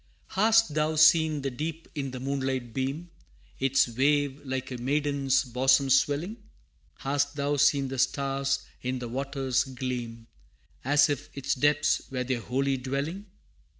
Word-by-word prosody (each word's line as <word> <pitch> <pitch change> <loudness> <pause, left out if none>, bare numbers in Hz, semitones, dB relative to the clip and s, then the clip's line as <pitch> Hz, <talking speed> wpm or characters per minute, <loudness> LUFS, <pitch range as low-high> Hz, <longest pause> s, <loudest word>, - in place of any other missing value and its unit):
[A] - - -37
III. - - -23
Hast 225 -6 +4
thou 155 +1 0
seen 155 -1 +5
the 135 - -2
deep 160 +5 -5
in 140 -3 -3
the 130 0 -7
moonlight 130 -3 -2
beam, 140 +7 -3 0.5
Its 135 0 +3
wave 140 +3 +1
like 130 -1 -4
a 125 - -4
maiden's 140 +1 +1
bosom 135 +2 +2
swelling? 145 - +2 0.6
Hast 145 +1 -1
thou 145 0 0
seen 140 -1 +3
the 135 -1 -4
stars 135 +1 0 0.2
in 130 +1 -2
the 125 -1 -5
water's 135 +1 -1
gleam, 125 -3 -5 0.6
As 145 +2 +4
if 145 -3 -3
its 135 - -1
depths 145 +2 +2
were 125 -1 -2
their 125 -2 -2
holy 135 +3 0
dwelling? 140 +10 -4
135 Hz, 150 wpm, -27 LUFS, 130-145 Hz, 0.6 s, seen